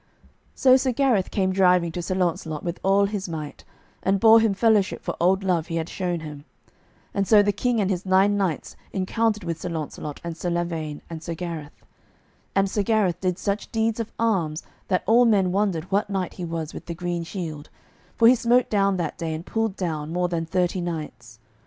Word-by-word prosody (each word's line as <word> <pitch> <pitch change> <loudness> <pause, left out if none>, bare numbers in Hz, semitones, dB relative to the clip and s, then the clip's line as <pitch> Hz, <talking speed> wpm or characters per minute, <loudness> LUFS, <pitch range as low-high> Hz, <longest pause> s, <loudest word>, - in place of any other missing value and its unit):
So 260 -1 +6
Sir 260 0 0
Gareth 240 -7 +2
came 190 -2 0
driving 180 -3 +3
to 175 - -4
Sir 185 +2 -2
Launcelot 165 -4 -1
with 170 0 -4
all 195 +1 +3
his 200 -2 -4
might, 155 -3 -6 0.4
and 195 +1 +1
bore 225 +1 +7
him 220 -3 +2
fellowship 215 -2 +2
for - - -3
old 190 +3 +3
love 175 -4 0
he 165 - -4
had 165 0 -2
shown 175 -3 -2
him. 150 -2 -8 0.7
And 200 -1 0
so 210 -2 +6
the 205 - +2
King 235 +3 0
and 200 -1 +1
his 180 -1 -2
nine 190 +2 +3
knights 190 -6 -2 0.2
encountered 210 +3 0
with 165 -1 -4
Sir - - -4
Launcelot 155 -2 -5
and 170 -1 -5
Sir 175 +2 -3
Lavaine 165 -3 -3
and 165 -1 -7
Sir 165 +1 -5
Gareth. 165 -4 -7 0.7
And 195 0 +3
Sir 205 +2 -1
Gareth 200 -4 +1
did 180 -2 0
such 200 +2 -3
deeds 225 0 0
of 225 - -4
arms 180 -9 0 0.2
that 185 -2 +1
all 230 +4 +5
men 195 -5 +3
wondered 190 -4 0
what 200 +1 +1
knight 190 -3 -2
he 180 - -6
was 165 -2 -4
with - - -9
the 170 - -4
green 175 0 -3
shield; 165 -4 -6 0.5
for 230 - +5
he 245 - +8
smote 245 0 +2
down 200 -2 +2
that 170 -3 -3
day 160 -1 -2
and 160 +2 -7
pulled 225 -1 -1
down 160 -5 -3
more 180 +1 0
than 165 -2 -2
thirty 180 +1 0
knights. 150 -9 -6
185 Hz, 205 wpm, -24 LUFS, 165-205 Hz, 0.7 s, he